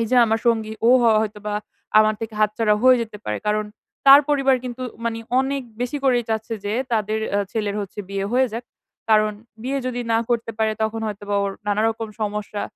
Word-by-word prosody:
এই 230 - 0
যে 255 - +3
আমার 225 0 0
সঙ্গী 220 -2 +1 0.2
ও - - +7
হয় 220 -2 +5
হয়তোবা, 210 -1 -4 0.4
আমার 215 0 +4
থেকে 225 -1 -5
হাতছাড়া 210 0 +2
হয়ে 255 0 +7
যেতে 215 -2 -8
পারে। 105 - -2
কারণ, 215 0 +1 0.4
তার 275 +1 +10
পরিবার 275 -2 +3
কিন্তু 250 0 -5 0.2
মানে 230 -1 -2 0.2
অনেক 275 0 -2 0.2
বেশি 250 +4 -2
করেই 245 -3 +3
চাচ্ছে 220 +1 -2
যে 205 - -2 0.2
তাদের 215 0 0 0.2
এহ 205 - +3
ছেলের 210 -2 -2
হচ্ছে 200 +1 -8
বিয়ে 195 0 -2
হয়ে 260 +1 +4
যাক। 235 +2 -5 0.5
কারণ, 215 0 +4 0.3
বিয়ে 275 +2 -1
যদি 245 -1 -2
না 225 - +4
করতে 235 -1 0
পারে 220 0 +2
তখন 220 +1 -1
হয়তোবা 205 -1 -3
ওর 200 - -1 0.2
নানারকম 220 +2 0
সমস্যা 210 -1 -3
220 Hz, 195 wpm, -22 LUFS, 210-240 Hz, 0.5 s, তার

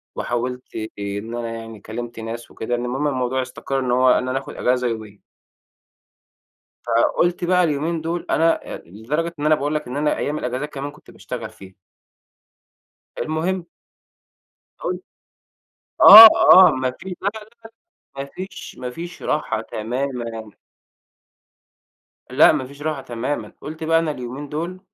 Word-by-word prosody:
وحاولت 125 +1 -4 0.2
إن 100 +3 -5
أنا 120 -1 -4
يعني 115 -1 -9
كلّمت 115 +2 -7
ناس 115 +1 -7
وكده، 120 +2 -3
المهم 125 +4 -2
إن 145 - -1
الموضوع 130 0 -1
استقَر 130 +1 -4
إنه 125 -2 0
هو، 130 0 +4
إن 130 - +1
أنا 130 +1 -1
آخُد 140 - -10
إجازة 125 0 0
يومين. 110 -3 -6 1.6
فقُلت 175 0 +1
بقى 180 +1 +3
اليومين 160 +1 -1
دول 165 +2 -3
أنا 165 +1 +1
آآ، - - -5
لدرجة 145 - -4
إن 145 - -3
أنا 155 0 +5
باقول 145 +1 -2
لك 150 -4 -3
إن 125 +3 -5
أنا 150 0 0
أيام 150 +1 -2
الإجازات 130 +4 -3
كمان 140 +1 -5
كنت 150 - -18
باشتغل - - -7
فيها. 95 -1 -15 1.4
المهم 170 +3 -2 1.2
هاقول - - -2
لك، - - -11 1.0
آه، 220 +2 +13 0.2
آه 185 0 +9
ما 130 0 -1
في 190 - -10
لا، 195 - 0
لا، 215 0 -11 0.7
ما 135 - -4
فيش 185 +7 -9
ما 125 - -5
فيش 170 +6 -9
راحة - - -1
تمامًا. 115 -1 -4 1.8
لأ 130 +5 +6
ما 145 -4 -2
فيش 140 +2 -14
راحة 155 -2 -3
تمامًا، 125 +4 -4
قُلت 160 +2 -7
بقى 165 +1 +3
أنا 160 -2 -1
اليومين 130 +2 -7
دول 170 +5 -4
135 Hz, 150 wpm, -21 LUFS, 120-155 Hz, 1.8 s, آه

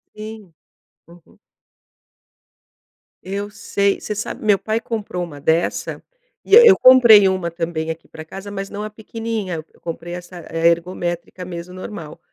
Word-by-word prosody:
Sim. 215 -4 -9 0.5
Uhum. 170 -1 -20 1.8
Eu 200 +2 -4
sei 200 -1 0
você 210 - -4
sabe, 215 - -5
meu 205 -2 +4
pai 220 +3 -2
comprou 210 -6 -4
uma 150 -4 -8
dessa 160 +4 -1 0.4
e 405 - +5
eu 465 -4 +9
comprei 235 -6 +8
uma 185 -3 -1
também 165 -1 -3
aqui 160 0 -9
pra 160 0 -10
casa, 195 +5 -9
mas 195 -1 -5
não 205 +1 -5
a 215 - -4
pequenininha, 215 -5 -5
eu - - -24
comprei 170 +1 -6
essa 180 0 -10
ergométrica 175 +2 -1
mesmo 175 0 -7
normal, 185 -5 -8
185 Hz, 140 wpm, -20 LUFS, 170-215 Hz, 1.8 s, eu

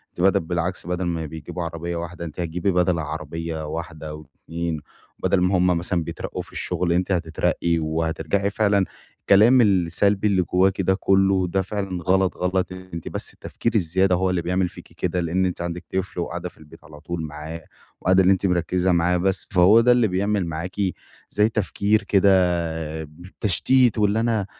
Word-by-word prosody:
ت - - -4
بدل 95 +1 +4
بالعكس، 85 +2 -3
بدل 90 +1 -2
ما 85 -2 -2
بيجيبوا 80 +3 -6
عربيّة 85 +1 -4
واحدة 85 0 -5
أنتِ 80 +2 -9
هتجيبي 85 +3 -1
بدل 90 -1 +2
عربيّة 80 +1 -5
واحدة 80 -1 -6
أو 75 0 -9 0.2
2 85 -1 -3 0.4
بدل 90 - +1
ما 90 +1 +2
هُم 90 0 +3
مثلًا 85 0 0
بيترقّوا - - -5
في - - -14
الشغل 85 -2 -1
أنتِ 90 +2 0
هتترقّي 85 -1 0
وهترجعي، 80 +5 -1
فعلًا 100 -2 +2 0.4
كلام 115 +6 +7
السلبي 100 +1 +2
اللي 95 -3 +2
جواكِ 95 +2 +2
ده 95 +1 +2
كلّه 95 -1 +2
ده 95 +2 0
فعلًا 95 -2 -4
غلط، 95 +1 +2
غلط، 90 0 -1
أنتِ 95 -3 -8
بس - - -3
التفكير 115 -1 -4
الزيادة 95 0 +2
هو 95 +1 +1
اللي 90 -2 0
بيعمل 90 +1 0
فيكِ - - -14
كده، 90 0 -1
لإن 90 +3 0
أنتِ 90 -1 -3
عندك 85 0 -4
طفل 95 -1 -2
وقاعدة 90 +1 -4
في - - -24
البيت 80 -1 -16
على 75 -1 -13
طول 85 +2 -5
معاه، 80 +2 -7 0.4
وقاعدة 95 +1 +4
اللي 95 - +5
أنتِ 95 - -2
مركزة 90 0 +1
معاه 90 +1 +2
بس، 95 0 0
فهو 100 +5 +6
ده 125 +1 +4
اللي 120 -2 +4
بيعمل 100 +1 0
معاكِ 85 +3 -5 0.5
زي 105 +2 +2
تفكير 105 0 0
كده 100 0 +3 1.1
تشتيت 120 +3 +3
وإن 105 0 +2
أنا 115 -3 +1
90 Hz, 175 wpm, -23 LUFS, 85-95 Hz, 1.1 s, كلام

